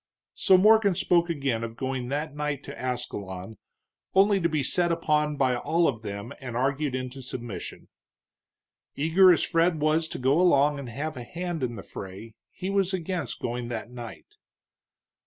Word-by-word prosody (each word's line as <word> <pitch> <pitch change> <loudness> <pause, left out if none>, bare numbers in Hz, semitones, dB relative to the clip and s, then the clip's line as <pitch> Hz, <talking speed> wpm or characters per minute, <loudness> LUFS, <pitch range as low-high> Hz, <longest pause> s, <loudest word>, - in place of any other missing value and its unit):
So 190 -3 +5
Morgan 210 -1 +5
spoke 170 0 +2
again 135 -8 -1
of 115 0 -5
going 130 -2 -3
that 145 +1 -3
night 150 -2 -2
to 140 - -8
Ascalon, 105 -6 -5 0.6
only 195 0 +5
to 170 - +2
be 155 -3 0
set 175 +5 +1
upon 150 -3 +1
by 130 -2 +2
all 165 +7 +1
of 110 - -2
them 100 +1 -6
and 125 -3 -5
argued 135 +1 0
into 130 +1 -5
submission. 120 -4 -7 1.1
Eager 170 +6 +6
as 170 - +3
Fred 165 -1 +2
was 155 +2 +2
to - - -6
go 135 +6 +3
along 145 -4 +4
and 135 -3 -7
have 145 +4 -4
a 120 - -5
hand 175 +4 -4
in 120 -2 -2
the 100 - -8
fray, 100 +4 -9 0.2
he 190 +1 -5
was 195 -1 +1
against 180 0 -4
going 120 0 -3
that 115 -1 -5
night. 120 -2 -10
145 Hz, 170 wpm, -27 LUFS, 125-170 Hz, 1.1 s, Eager